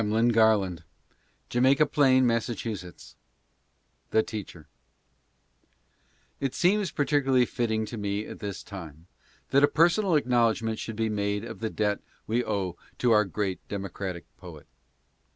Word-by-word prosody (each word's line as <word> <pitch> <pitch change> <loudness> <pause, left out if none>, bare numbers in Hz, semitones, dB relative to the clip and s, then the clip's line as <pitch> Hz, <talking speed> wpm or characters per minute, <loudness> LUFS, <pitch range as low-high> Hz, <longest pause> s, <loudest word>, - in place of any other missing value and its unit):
HAMLIN 110 +2 +2
GARLAND: 110 -6 +3 0.7
Jamaica 130 +4 +4
Plain, 130 -3 +4
Mass. 115 -2 +1
THE 110 +1 -6
TEACHER. 90 -7 -8 1.7
It 135 -2 -2
seems 195 +1 +2
peculiarly 140 -4 +2
fitting 110 -2 -1
to 115 +1 -7
me 100 +1 -2
at - - -9
this 100 -2 -5
time 85 -5 -10 0.5
that 140 +1 +4
a - - +8
personal 175 +4 +3
acknowledgment 115 -5 +1
should 110 - -5
be 110 +1 0
made 100 -1 -1
of 110 - -8
the 110 0 -2
debt 105 -1 0
that - - -36
we 120 +3 0
owe 95 -5 -2 0.2
to 125 - +2
our 105 -1 +5
great 95 0 -2
democratic 95 -3 -5
poet. - - -11
110 Hz, 135 wpm, -27 LUFS, 100-125 Hz, 1.7 s, a